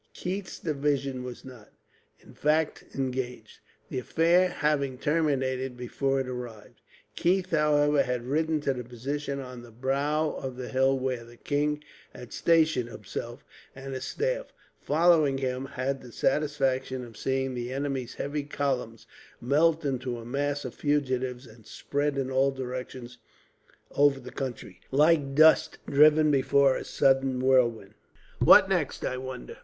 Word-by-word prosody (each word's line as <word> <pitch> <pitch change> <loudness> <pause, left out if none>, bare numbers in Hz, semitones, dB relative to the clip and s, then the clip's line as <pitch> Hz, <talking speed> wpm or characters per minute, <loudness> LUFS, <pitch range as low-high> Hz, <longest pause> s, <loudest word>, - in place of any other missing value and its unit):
Keith's 190 +1 -4
division 140 -4 -1
was 125 0 -8
not, 125 -5 -12 0.5
in - - -17
fact, 155 +1 0
engaged; 130 -2 -4 0.3
the 130 - -3
affair 170 +7 +3
having 145 -6 0
terminated 130 -4 0
before 135 +2 -1
it 135 - -2
arrived. 125 -4 -8 0.3
Keith, 185 +1 +1
however, 150 -2 +3
had 125 -1 -2
ridden 155 +3 0
to 140 -2 0
the 125 -1 -6
position 140 +4 -4
on 125 -2 -8
the 120 - -13
brow 140 +6 0
of 130 -2 -6
the 125 -2 -6
hill 130 +3 +2
where 130 -2 -2
the 120 0 -15
king 150 +2 -1 0.3
had 125 - -10
stationed 160 -7 +2
himself; - - -7 0.3
and 135 0 -7
his 130 0 -4
staff, - - -2 0.3
following 155 -3 +3
him, 130 0 -2
had 135 0 -3
the 125 - -12
satisfaction 130 -3 0
of 115 -2 -13
seeing 135 +3 -1
the 120 0 -4
enemy's 135 -2 -3
heavy 145 +1 -3
columns 135 -5 -3 0.3
melt 155 +5 +2
into 125 -3 -2
a 115 - -9
mass 145 +3 -2
of - - -5
fugitives, 130 -3 -1
and 110 -2 -17
spread 145 0 -2
in 135 -1 -2
all 135 +1 +3
directions 125 -2 -6 0.7
over 145 -1 +3
the 125 -1 -10
country, 120 -8 -6
like 145 -1 +3
dust 155 +1 +5
driven 150 +1 +5
before 135 0 +3
a - - -4
sudden 135 -1 +2
whirlwind. 120 -6 +2 0.5
"What - - +7
next, - - -1
I 130 - -2
wonder?" 130 - -7
135 Hz, 145 wpm, -27 LUFS, 125-150 Hz, 0.7 s, What